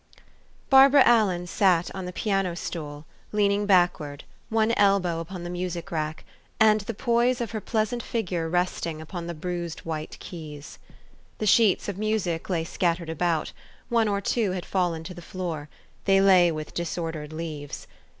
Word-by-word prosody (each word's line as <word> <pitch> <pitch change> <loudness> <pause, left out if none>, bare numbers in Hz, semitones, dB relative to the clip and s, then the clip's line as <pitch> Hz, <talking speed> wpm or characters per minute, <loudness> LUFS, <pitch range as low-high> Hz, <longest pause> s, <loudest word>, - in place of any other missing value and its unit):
BARBARA 270 +1 +8
ALLEN 200 -7 +3
sat 180 -2 +2
on 190 -1 -5
the 180 - -5
piano 195 -2 -1
stool, 150 -3 -6 0.3
lean 205 -1 +3
ing 205 0 0
backward, 175 -7 +2 0.3
one 220 0 +2
elbow 195 -6 +2
upon 175 +2 -6
the 175 - -5
music 180 0 -4
rack, 155 -1 -3 0.3
and 215 -1 +5
the 200 - -5
poise 240 +2 +2
of 235 - -3
her 220 -2 -4
pleasant 220 +3 -1
figure 180 -9 -2
resting 175 -2 -1
upon 170 +2 -6
the 170 - -5
bruised 170 0 -4
white 155 -1 -5
ke} - - -12
T 155 -4 -7
s. 145 +2 -12 0.6
The 215 - -2
sheets 210 -1 +4
of 200 -1 -4
music 205 -7 -1
lay 170 -3 0
scattered 170 -1 -1
about; 165 0 0 0.4
one 230 -2 +3
or 200 -1 0
two 205 -2 0
had 180 -2 -4
fallen 175 -4 -1
to 180 - -7
the 175 - -10
floor: 165 -4 -5 0.4
they 195 -1 +5
lay 185 -3 +6
with 155 -1 -6
disordered 165 -3 -4
leaves. 155 -3 -6
180 Hz, 170 wpm, -26 LUFS, 165-205 Hz, 0.6 s, BARBARA